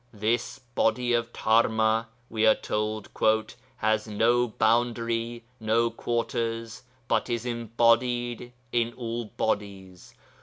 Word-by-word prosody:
'This 110 +2 -1 0.2
Body 120 +1 +1
of 120 0 0
Dharma,' 110 0 +2 0.2
we 110 -1 +1
are 110 - +7
told, 105 0 -3 0.7
'has 110 0 0
no 120 +3 +2
boundary, 115 +1 0 0.2
no 115 +1 +2
quarters, 115 -1 -2 0.3
but 115 -2 +1
is 120 0 -2
embodied 120 +1 +1 0.2
in 120 0 +1
all 120 -1 -4
bodies.... 100 -4 -4
115 Hz, 105 wpm, -27 LUFS, 110-120 Hz, 0.7 s, are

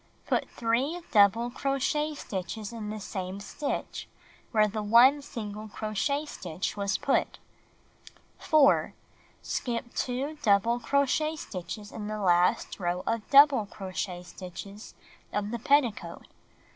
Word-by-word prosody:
Put - - 0
3 255 +9 -1
double 220 +3 +4
crochet 280 +3 -1
stitches 205 -1 -5
in 215 -2 -5
the 215 0 -5
same 190 -1 -5
stitch 280 +8 -4 0.4
where 215 -2 +3
the 215 +1 -3
1 240 +7 +6
single 215 -6 -7
crochet 215 +8 -2
stitch 180 - -5
was 200 -2 0
put. 275 - 0 1.0
4. 295 -3 +4 0.5
Skip 235 -1 -3
2 275 +5 -2
double 225 +1 +3
crochet 280 +4 +1
stitches 205 - -7
in 210 -2 -6
the 215 0 -3
last 180 +2 +2
row 180 0 -1
of 230 -2 -2
dou 280 +1 +10
ble 260 -8 -3
crochet 185 -2 -5
stitches 190 +4 -10 0.4
of 205 0 -2
the 235 - -3
pet 285 +5 +5
ticoat. 190 -8 -7
215 Hz, 130 wpm, -28 LUFS, 200-270 Hz, 1.0 s, dou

